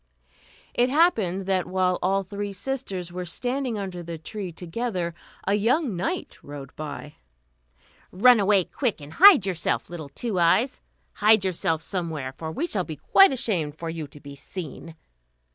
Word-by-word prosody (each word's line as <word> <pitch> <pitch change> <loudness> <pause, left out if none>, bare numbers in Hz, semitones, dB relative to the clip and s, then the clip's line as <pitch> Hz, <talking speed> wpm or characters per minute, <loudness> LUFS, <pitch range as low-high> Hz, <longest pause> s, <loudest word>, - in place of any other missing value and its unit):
It 245 +1 +2
happened 220 - +2
that 190 -1 0
while 185 -1 +1
all 195 +2 +1
three 200 +1 -5
sisters 195 -6 -4
were 180 +1 -4
standing 245 +6 -2
under 190 -3 -5
the 170 -1 -6
tree 190 +3 -6
together 175 +1 -3 0.3
a 195 - +1
young 235 - +1
knight 175 - -3
rode 140 -2 -10
by. 150 -1 -7 0.9
"Run 240 +5 +6
away, 200 -1 +4
quick, 240 - -2
and 145 +1 -11
hide 365 - +8
yourself, 175 -3 -1
little 160 -5 -7
Two 200 - -3
Eyes; 195 +10 +2 0.3
hide 215 -1 +4
yourself 165 -3 -1
somewhere, 160 -8 -4
for 160 +4 -6
we 295 - -2
shall 205 - -1
be 160 -3 -7
quite 390 - +5
ashamed 185 - -1
for 165 0 -4
you 160 -2 -5
to 145 - -15
be 140 0 -11
seen." 165 +2 -8
185 Hz, 160 wpm, -25 LUFS, 165-220 Hz, 0.9 s, hide